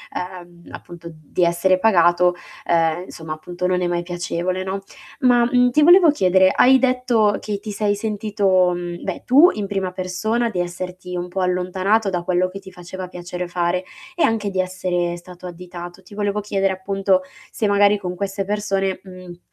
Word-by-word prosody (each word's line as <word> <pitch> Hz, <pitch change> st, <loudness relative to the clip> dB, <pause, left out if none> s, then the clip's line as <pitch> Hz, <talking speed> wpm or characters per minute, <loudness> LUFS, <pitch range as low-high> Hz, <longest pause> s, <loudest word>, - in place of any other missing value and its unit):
ehm, 175 Hz, -1 st, -8 dB
appunto 170 Hz, -1 st, -10 dB
di 155 Hz, +3 st, -3 dB
essere 175 Hz, +2 st, +2 dB
pagato, 175 Hz, -4 st, +4 dB, 0.4 s
ehm, 165 Hz, +1 st, +1 dB
insomma, 160 Hz, -4 st, -7 dB
appunto, 175 Hz, +3 st, -4 dB
non 180 Hz, 0 st, 0 dB
è 175 Hz, -, 0 dB
mai 175 Hz, 0 st, -1 dB
piacevole, 175 Hz, +1 st, -3 dB
no. 190 Hz, +1 st, -4 dB, 0.4 s
Ma, 245 Hz, -2 st, +4 dB
mhmm 250 Hz, 0 st, +3 dB
,ti 300 Hz, -, +3 dB
volevo 350 Hz, +1 st, +7 dB
chiedere, 190 Hz, -6 st, +3 dB
hai 265 Hz, +1 st, +6 dB
detto 250 Hz, -5 st, +2 dB
che 205 Hz, -2 st, -4 dB
ti 210 Hz, 0 st, -7 dB
sei 205 Hz, 0 st, 0 dB
sentito, 205 Hz, -4 st, +1 dB
beh, 175 Hz, +1 st, -5 dB
tu 290 Hz, +8 st, +7 dB
in 205 Hz, -2 st, -3 dB
prima 195 Hz, -2 st, -2 dB
persona 195 Hz, +6 st, -1 dB
di 180 Hz, -, -4 dB
esserti 180 Hz, +1 st, -5 dB
un 175 Hz, 0 st, -3 dB
po' 190 Hz, -, -4 dB
allontanato 185 Hz, +4 st, +1 dB
da 175 Hz, -2 st, -2 dB
quello 180 Hz, 0 st, +1 dB
che 195 Hz, +1 st, -8 dB
ti 190 Hz, -, -13 dB
faceva 180 Hz, +1 st, -8 dB
piacere 180 Hz, 0 st, -6 dB
fare 175 Hz, +1 st, -1 dB, 0.3 s
e 345 Hz, -, +1 dB
anche 215 Hz, -3 st, +1 dB
di 190 Hz, -1 st, -3 dB
essere 180 Hz, -2 st, -2 dB
stato 180 Hz, +1 st, -13 dB
additato. 175 Hz, 0 st, -9 dB
Ti 185 Hz, -, -17 dB
volevo 205 Hz, 0 st, -1 dB
chiedere, 195 Hz, -2 st, 0 dB
appunto, 190 Hz, 0 st, 0 dB, 0.3 s
se 215 Hz, -, -1 dB
magari 205 Hz, 0 st, +4 dB
con 180 Hz, -2 st, -5 dB
queste 195 Hz, +1 st, -3 dB
persone, 195 Hz, -2 st, -1 dB
mhmm, 185 Hz, -2 st, -12 dB
185 Hz, 175 wpm, -21 LUFS, 175-205 Hz, 0.4 s, volevo